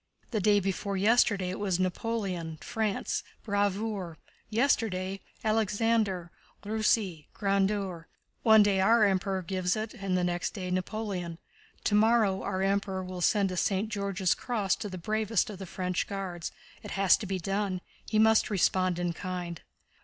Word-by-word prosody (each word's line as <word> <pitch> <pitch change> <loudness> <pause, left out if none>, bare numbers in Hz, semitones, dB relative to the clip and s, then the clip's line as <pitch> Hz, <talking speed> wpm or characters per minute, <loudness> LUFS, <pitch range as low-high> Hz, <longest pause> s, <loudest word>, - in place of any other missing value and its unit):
"The 220 - 0
day 205 +1 +4
before 195 +1 -2
yesterday 200 -3 +3
it 185 - -5
was 195 -4 0
'Napoléon, 185 -3 -2
France, 215 +1 -1 0.2
bravoure'; 200 -4 -1 0.3
yesterday, 210 -5 +1 0.2
'Alexandre, 215 -4 +1 0.3
Russie, 210 -6 0
grandeur.' 195 -4 0 0.3
One 220 -2 +7
day 195 -2 +2
our 220 +2 +5
Emperor 190 -1 0
gives 180 0 0
it 215 0 -4
and 195 -5 -2
next 175 0 -1
day 185 -3 -4
Napoleon. 185 -2 -3 0.5
Tomorrow 210 -2 +3
our 190 +1 -2
Emperor 195 -1 0
will 185 -1 -6
send 195 +1 +3
a 180 - -4
St. 200 +4 +1
George's 200 -3 0
Cross 215 -7 -1
to 205 - -5
the 185 - -6
bravest 215 +4 0
of 195 - -9
the 190 - -7
French 180 0 -2
Guards. 185 -4 -4 0.3
It - - -8
has 195 -1 +6
to 210 - -6
be 190 0 -1
done. 195 +1 -1 0.3
He 215 - +1
must 220 0 +5
respond 185 -2 +2
in 175 -1 -1
kind." 180 -1 -5
195 Hz, 145 wpm, -29 LUFS, 185-215 Hz, 0.5 s, One